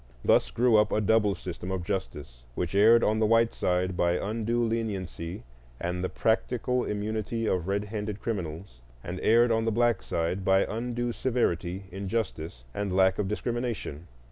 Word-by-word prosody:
Thus - - +4
grew 120 -1 +3
up 105 0 +3
a - - +2
double 105 -1 +3
system 90 0 -7
of 95 -2 -2
justice, 75 -10 -5
which 90 0 -2
erred 110 +4 +6
on 110 +1 +2
the 110 - +3
white 115 +1 +3
side 90 0 0
by 85 0 +2
undue 115 +5 -1
leniency 100 -6 -3 0.4
and 90 +1 -3
the 90 - -1
practical 125 +2 0
immunity 110 +2 -2
of 90 -4 0
red 100 +1 0
handed 105 -1 -4
criminals, 85 - -5 0.2
and 90 +2 -5
erred 115 +2 +4
on 115 0 +1
the 115 - +1
black 120 +1 +2
side 85 +4 -2
by 95 +1 +4
undue 120 +1 -2
severity, 95 -8 -1
injustice, 95 - -4
and 100 -2 -2
lack 95 0 +4
of 100 - 0
discrimination. 115 - -3
105 Hz, 165 wpm, -28 LUFS, 90-115 Hz, 0.4 s, erred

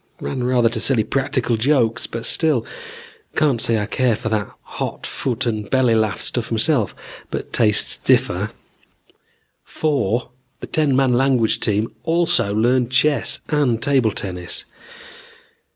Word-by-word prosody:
Ran 70 - -4
rather 125 -1 +3
to 115 0 -1
silly 125 -5 +3
practical 130 -2 -1
jokes, 125 -1 +1
but 115 0 -6
still. 155 -8 +2 0.7
Can't 140 -7 +2
say 115 - +3
I 105 - -1
care 120 +1 +1
for 110 - -4
that 105 -3 -1
hot - - -5
foot 130 -1 -3
and 110 -3 -3
belly 130 -3 +3
laugh 110 -2 +1
stuff 120 -2 -3
myself, 115 0 +1 0.3
but - - -6
tastes 105 -3 +3
differ. - - +1 1.1
"Four, 125 -6 -1 0.3
the - - -6
ten 150 -4 +1
man 130 -2 +3
language 125 -3 +2
team 105 +1 0
also 165 -9 +1
learned 120 +3 +2
chess 140 +3 +2
and 140 -7 +1
table 130 -3 +2
tennis. 90 -4 -4
120 Hz, 135 wpm, -20 LUFS, 110-135 Hz, 1.1 s, rather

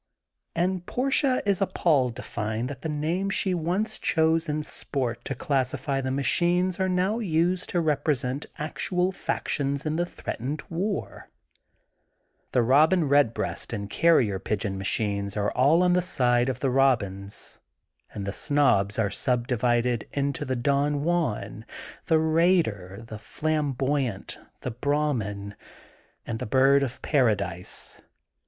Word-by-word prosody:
And 180 +1 0
Portia 265 0 +1
is 200 -2 +1
appalled 140 -10 +2
to 125 - -7
find 110 +2 -3
that 135 -2 -9
the 160 - -3
names 165 +6 -1
she 190 - +1
once 180 +6 -1
chose 160 0 +2
in, 150 +1 -1
sport 120 -5 -3
"to 135 - -3
classify 135 +1 -1
the 130 - -2
machines 175 +7 +1
are 190 0 +1
now 185 +5 +1
used 180 -2 +1
to 175 - 0
rep 155 -3 0
resent 135 -2 -1
actual 180 +4 -1
factions 140 -5 -2
in 155 +1 -1
the 175 - +1
threatened 140 -1 -5
war. 195 +5 -3 1.2
The 125 - +3
Eobin 150 +5 +4
Redbreast 140 -4 +1
and 100 -2 -5
Carrier 125 - +3
Pigeon 100 -1 -2
machines 100 +1 -1
are 105 0 0
all 145 +8 +4
on 180 0 +3
the 180 - +3
side 125 -7 +2
of 130 -1 -4
the 135 - +1
Robins, 105 -7 0 0.5
and 100 - -5
the 100 - -3
Snobs 105 -10 +2
are 105 -3 +1
subdivided 120 0 0
into 140 -1 -1
the 130 - -1
Don 140 +3 +1
Juan, 145 -11 -1 0.4
the 160 - +4
Raider, 155 - +1
the 110 -2 -8
Flamboyant, 140 -2 -2 0.2
the 125 - -3
Brah 145 +4 0
min 100 -2 -5 0.7
and 115 -1 -4
the - - -4
Bird 135 +4 +4
of 130 -3 -4
Paradise. 100 - -1
140 Hz, 140 wpm, -26 LUFS, 115-165 Hz, 1.2 s, Eobin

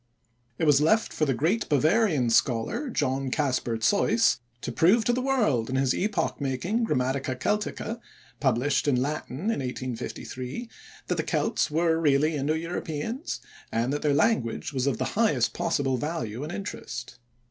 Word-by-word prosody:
It - - 0
was 145 -1 +5
left 215 +9 +2
for 155 - +1
the 135 - +1
great 185 - 0
Bavarian 155 - +3
scholar, 120 - +1
John 135 - -1
Caspar 125 -5 0
Zeuss, 205 - +3 0.2
to 125 - -4
prove 195 - +4
to 240 - +3
the 255 - 0
world 215 - +1
in 130 - -2
his 135 -1 +2
epoch 195 -7 -1
making 175 - -1
"Grammatica 130 -1 0
Celtica" 210 - -2 0.4
(published 140 +2 +1
in 130 -4 +3
Latin 140 0 -3
in - - -1
1853) 130 - -5 0.4
that - - -1
the - - 0
Celts - - 0
were 165 +1 +2
really 150 +1 +3
Indo 145 +2 0
Europeans, 170 - -4 0.3
and 120 +4 0
that 145 - -2
their 150 - +2
language 145 - +1
was 130 0 0
of 135 - +1
the - - -1
highest 200 - +2
possible 140 -6 0
value 125 -5 -3
and 150 +3 -5
interest. 125 - -6
145 Hz, 160 wpm, -27 LUFS, 130-190 Hz, 0.4 s, was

